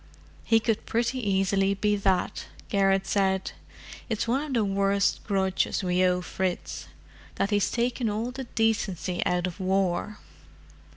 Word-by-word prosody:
"He 225 Hz, -1 st, +4 dB
could 225 Hz, -1 st, -1 dB
pretty 235 Hz, +3 st, 0 dB
easily 195 Hz, -2 st, +1 dB
be 210 Hz, +1 st, +1 dB
that," 195 Hz, -3 st, 0 dB, 0.2 s
Garrett 195 Hz, -1 st, +2 dB
said. 190 Hz, -1 st, +1 dB, 0.6 s
"It's 225 Hz, 0 st, -1 dB
one 255 Hz, +4 st, +1 dB
of 300 Hz, -2 st, -4 dB
the 225 Hz, -3 st, +2 dB
worst 200 Hz, 0 st, +1 dB
grudges 190 Hz, -1 st, 0 dB
we 180 Hz, 0 st, +2 dB
owe 180 Hz, 0 st, +2 dB
Fritz—that 190 Hz, +2 st, -5 dB
he's 205 Hz, -1 st, +2 dB
taken 240 Hz, -1 st, 0 dB
all 220 Hz, +4 st, -2 dB
the 265 Hz, +1 st, -6 dB
decency 205 Hz, -6 st, -1 dB
out 180 Hz, 0 st, +1 dB
of 180 Hz, +1 st, -5 dB
war. 190 Hz, +2 st, 0 dB
200 Hz, 135 wpm, -27 LUFS, 190-225 Hz, 0.6 s, He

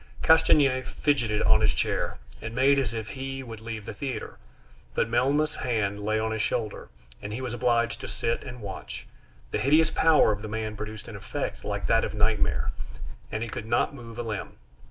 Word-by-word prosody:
Castanier 150 Hz, -5 st, +5 dB
fidgeted 130 Hz, -5 st, 0 dB
on 110 Hz, 0 st, +5 dB
his 110 Hz, -2 st, +3 dB
chair, -, -, -1 dB, 0.2 s
and 110 Hz, +1 st, -5 dB
made 140 Hz, +2 st, +5 dB
as 125 Hz, -6 st, 0 dB
if 110 Hz, -2 st, -4 dB
he 135 Hz, +4 st, -5 dB
would 115 Hz, -3 st, -8 dB
leave 110 Hz, -2 st, -5 dB
the -, -, -5 dB
theater, 125 Hz, -1 st, -5 dB, 0.6 s
but -, -, +2 dB
Melmoth's 140 Hz, +6 st, +2 dB
hand 110 Hz, -5 st, 0 dB
lay 110 Hz, +1 st, +1 dB
on 110 Hz, 0 st, 0 dB
his 110 Hz, -1 st, -1 dB
shoulder, 110 Hz, -1 st, -2 dB, 0.3 s
and 100 Hz, -, -5 dB
he 110 Hz, -, -3 dB
was 125 Hz, -2 st, -3 dB
obliged 120 Hz, -1 st, +1 dB
to -, -, -5 dB
sit 115 Hz, -, -1 dB
and 125 Hz, -2 st, -8 dB
watch; 95 Hz, -11 st, -7 dB, 0.5 s
the -, -, 0 dB
hideous 155 Hz, +4 st, +4 dB
power 155 Hz, -8 st, +5 dB
of 105 Hz, -1 st, -2 dB
the 110 Hz, -, -5 dB
man 110 Hz, 0 st, -3 dB
produced 110 Hz, +1 st, -7 dB
an 110 Hz, -, -7 dB
effect 100 Hz, 0 st, -4 dB
like -, -, -2 dB
that -, -, +3 dB
of -, -, -3 dB
nightmare, -, -, +2 dB, 0.6 s
and 110 Hz, +1 st, -2 dB
he 115 Hz, -, -4 dB
could 110 Hz, -, -5 dB
not 120 Hz, +4 st, +2 dB
move 115 Hz, -4 st, -10 dB
a 120 Hz, -, -2 dB
limb. 110 Hz, -4 st, -5 dB
115 Hz, 195 wpm, -27 LUFS, 110-130 Hz, 0.6 s, Castanier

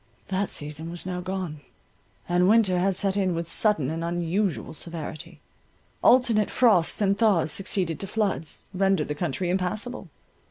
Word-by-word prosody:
That 190 Hz, +1 st, -1 dB
season 150 Hz, +2 st, -4 dB
was 175 Hz, +1 st, -5 dB
now 180 Hz, -1 st, -3 dB
gone; 180 Hz, -5 st, -4 dB, 0.7 s
and 180 Hz, +1 st, +3 dB
winter 205 Hz, -5 st, +4 dB
had 190 Hz, +1 st, +1 dB
set 195 Hz, +1 st, 0 dB
in 190 Hz, -3 st, +1 dB
with 165 Hz, 0 st, -3 dB
sudden 165 Hz, -, +1 dB
and 165 Hz, +1 st, -3 dB
unusual 175 Hz, +3 st, -1 dB
severity. 160 Hz, 0 st, -6 dB, 0.6 s
Alternate 235 Hz, -5 st, +4 dB
frosts 210 Hz, -10 st, +3 dB
and 200 Hz, -1 st, +3 dB
thaws 200 Hz, -8 st, +2 dB
succeeding 185 Hz, -3 st, -1 dB
to 195 Hz, -, -5 dB
floods, 195 Hz, -7 st, -2 dB
rendered 195 Hz, -1 st, +1 dB
the -, -, 0 dB
country 175 Hz, +3 st, -2 dB
impassable. 190 Hz, +3 st, -2 dB
180 Hz, 150 wpm, -25 LUFS, 165-200 Hz, 0.7 s, winter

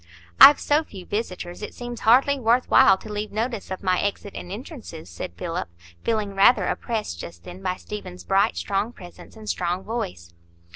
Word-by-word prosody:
"I've 290 Hz, -, +10 dB
so 295 Hz, +2 st, +2 dB
few 190 Hz, -, -11 dB
visitors, 180 Hz, -4 st, -4 dB
it 210 Hz, -, -7 dB
seems 240 Hz, -1 st, -6 dB
hardly 270 Hz, +5 st, +4 dB
worth 240 Hz, +1 st, +2 dB
while 190 Hz, -, +7 dB
to 210 Hz, +2 st, -9 dB
leave 210 Hz, 0 st, -4 dB
notice 225 Hz, 0 st, -3 dB
of 190 Hz, +1 st, -6 dB
my 185 Hz, -1 st, +2 dB
exit 200 Hz, 0 st, -3 dB
and 175 Hz, -, -7 dB
entrances," 215 Hz, -, -9 dB
said 85 Hz, 0 st, -6 dB
Philip, -, -, -4 dB, 0.3 s
feeling 215 Hz, -3 st, -1 dB
rather 195 Hz, +5 st, +5 dB
oppressed 215 Hz, -, -3 dB
just 85 Hz, 0 st, -9 dB
then 180 Hz, +2 st, -10 dB
by 185 Hz, -1 st, -1 dB
Stephen's 185 Hz, -3 st, -8 dB
bright 195 Hz, -, +2 dB
strong 195 Hz, -, -1 dB
presence 175 Hz, +1 st, -13 dB
and 220 Hz, -1 st, -12 dB
strong 180 Hz, -1 st, -1 dB
voice. 90 Hz, -, -5 dB
205 Hz, 180 wpm, -24 LUFS, 180-230 Hz, 0.3 s, I've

